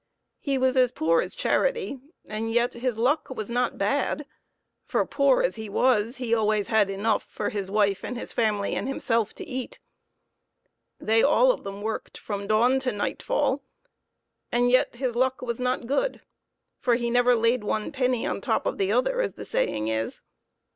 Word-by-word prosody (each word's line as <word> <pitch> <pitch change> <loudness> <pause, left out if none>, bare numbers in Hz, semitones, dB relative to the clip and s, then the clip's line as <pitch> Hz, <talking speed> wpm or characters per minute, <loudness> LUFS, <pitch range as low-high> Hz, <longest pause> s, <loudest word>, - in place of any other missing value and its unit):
He 275 -2 -1
was 260 0 +2
as 250 -2 +4
poor 165 -3 +2
as - - -4
charity, 475 - 0 0.3
and 220 +1 -4
yet 240 +1 +2
his 240 -1 -2
luck 270 +7 +1
was 235 -4 -5
not 245 0 0
bad, 280 +7 0 0.6
for, - - 0
poor 280 -2 +3
as 185 - 0
he 220 -1 -6
was, 235 +2 +2
he 245 -3 -1
always 215 -1 +1
had 220 -3 +3
enough 205 +3 0
for - - -3
his 200 -3 -4
wife 200 -1 +1
and 250 - -4
his - - -7
family 210 -4 0
and - - -2
himself 230 -5 -1
to - - -8
eat. 260 - -5 1.2
They 225 +1 +3
all - - +5
of - - -5
them 200 +1 -7
worked 220 0 -4
from 200 -1 -5
dawn 240 +5 +3
to 260 -1 -1
nightfall, 350 - -1 0.9
and 245 +1 +2
yet 255 -1 +3
his 245 -1 -2
luck 260 +1 +1
was 235 -1 -3
not 250 -1 -1
good, 285 - -1 0.6
for 245 -2 +2
he 235 0 -1
never 245 0 +4
laid 230 0 +2
one 215 +4 -2
penny 255 -4 0
on - - -2
top - - 0
of - - -2
the 195 0 +1
other, - - +2
as - - -2
the - - -8
saying 455 - -1
is. 110 0 -2
235 Hz, 180 wpm, -26 LUFS, 215-260 Hz, 1.2 s, all